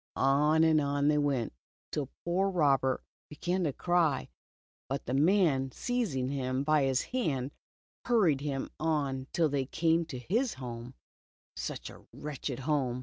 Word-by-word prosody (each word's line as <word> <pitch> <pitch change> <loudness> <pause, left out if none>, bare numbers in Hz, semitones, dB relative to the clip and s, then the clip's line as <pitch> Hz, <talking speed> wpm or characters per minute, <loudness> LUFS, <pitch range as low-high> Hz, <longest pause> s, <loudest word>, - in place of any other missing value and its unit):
On 150 +4 +4
and 160 -1 +4
on 145 0 +1
they 150 0 +3
went, 140 - 0 0.4
till 140 -3 -2 0.2
poor 185 +3 +2
Robert 140 -7 +2 0.3
began 175 +4 -1
to 150 - +1
cry, 170 -1 +1 0.6
but 135 +1 -3
the 125 - -2
man 145 -3 +3
seizing 195 - -1
him 130 -1 -1
by 145 -2 +3
the 130 - +1
hand, 145 - -1 0.5
hur 240 -3 +3
ried 145 -5 +2
him 140 -2 -3
on 140 -4 -1
till 165 -2 +2
they 140 -2 -1
came 165 +2 +2
to 150 -5 -6
his 220 - 0
home 125 -1 -7 0.3
— - - - 0.2
such - - -5
a - - -14
wretched 140 -3 -5
home. 130 -4 0
145 Hz, 155 wpm, -31 LUFS, 135-165 Hz, 0.6 s, On